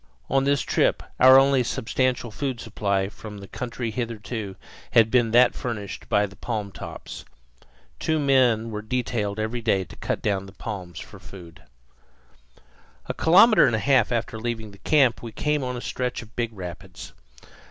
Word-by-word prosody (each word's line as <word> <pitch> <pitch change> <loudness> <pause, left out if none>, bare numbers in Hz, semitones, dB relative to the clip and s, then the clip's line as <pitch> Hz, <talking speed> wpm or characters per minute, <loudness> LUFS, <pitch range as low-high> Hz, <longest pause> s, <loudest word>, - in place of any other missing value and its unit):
On 135 0 +2
this 140 -2 +2
trip - - +1 0.2
our 130 +1 +9
only 135 -1 +4
substantial 125 0 -1
food 130 +1 -3
supply 100 -4 -1
from 105 +1 -10
the 100 -1 -10
country 120 -1 -5
hitherto 110 -3 -5 0.4
had 115 -2 +5
been 120 -3 +3
that 120 +2 +5
furnished 105 -5 -6
by 105 0 +3
the 100 -1 -11
palmtops. 105 -4 -6 0.8
Two 160 - 0
men 125 -6 +2
were 105 0 -4
detailed 110 -3 -2
every 110 +3 -2
day 100 -4 +1
to - - -13
cut - - -3
down 100 -2 -1
palms 95 -7 -6
for - - -10
food. 85 -3 -13 1.4
A - - -3
kilometre 190 - +6
and 120 - +1
a - - +1
half 130 +5 +3
after 115 -1 -2
leaving 110 -2 -4
this 100 - -17
camp 135 -6 +3
we 115 - -7
came 150 +4 -1
on 125 -1 -3
a - - -6
stretch 125 -1 -3
of 110 -1 -18
big 120 -1 -2
rapids. 90 -2 -9
115 Hz, 165 wpm, -24 LUFS, 105-125 Hz, 1.4 s, our